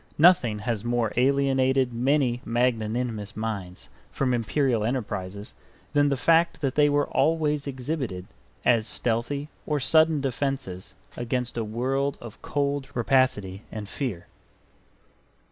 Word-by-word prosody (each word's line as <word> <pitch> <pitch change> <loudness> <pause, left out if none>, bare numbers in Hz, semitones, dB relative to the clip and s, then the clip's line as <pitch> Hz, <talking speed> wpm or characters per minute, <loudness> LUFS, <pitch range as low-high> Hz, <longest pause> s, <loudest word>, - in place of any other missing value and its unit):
Nothing 150 -10 +5
has 110 -1 -2
more 120 -2 0
alienated 130 -1 +2
many 125 0 +1
magnanimous 115 -2 -1
minds 100 -5 -5 0.2
from 125 +7 0
Imperial 120 0 +1
enterprises 105 -5 -3 0.4
than 145 -1 +4
the 140 - 0
fact 165 +5 +3
that 135 -3 0
they 150 -1 +4
are 145 0 +2
always 150 -1 +1
exhibited 130 - -4 0.4
as 115 -2 +3
stealthy 125 +5 -1 0.2
or 150 -1 0
sudden 155 +2 +4
defenses 130 -8 -3 0.2
against 125 0 -2
a 115 - -1
world 130 +6 -1
of 115 -3 -11
cold 140 -1 -1
rapacity 120 -6 +1
and 105 -2 -6
fear. 105 -6 -4
125 Hz, 120 wpm, -26 LUFS, 110-140 Hz, 0.4 s, Nothing